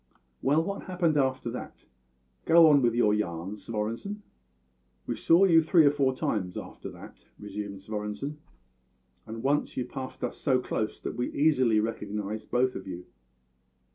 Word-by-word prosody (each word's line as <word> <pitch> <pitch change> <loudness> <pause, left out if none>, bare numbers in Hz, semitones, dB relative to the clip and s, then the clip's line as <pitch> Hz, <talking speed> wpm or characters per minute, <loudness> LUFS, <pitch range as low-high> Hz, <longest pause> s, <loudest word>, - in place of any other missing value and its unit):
"Well, 150 +4 +3
what 200 +3 -5
happened 175 -4 +1
after 130 -4 0
that? 125 - -8 0.6
Go 165 0 +7
on 140 -2 +5
with 120 -2 +2
your 110 -3 +3
yarn, 95 -2 -2
Svorenssen." 115 - -4 0.8
"We - - -2
saw 170 +4 +4
you 165 -3 +6
three 160 0 +5
or 145 - +6
four 135 -3 +1
times 95 -7 -2
after - - -8
that," - - -13
resumed 100 -1 -6
Svorenssen, 105 +8 -5 0.9
"and 115 +1 -7
once 145 +2 0
you 125 - -1
passed 130 -1 -7
so 130 -4 +1
close 110 -3 -3
that - - -4
we 125 - -2
easily 130 -7 +3
recognised 105 -1 -4
both 125 +1 +2
of 95 - -7
you. 90 -1 -7
125 Hz, 150 wpm, -28 LUFS, 105-145 Hz, 0.9 s, Go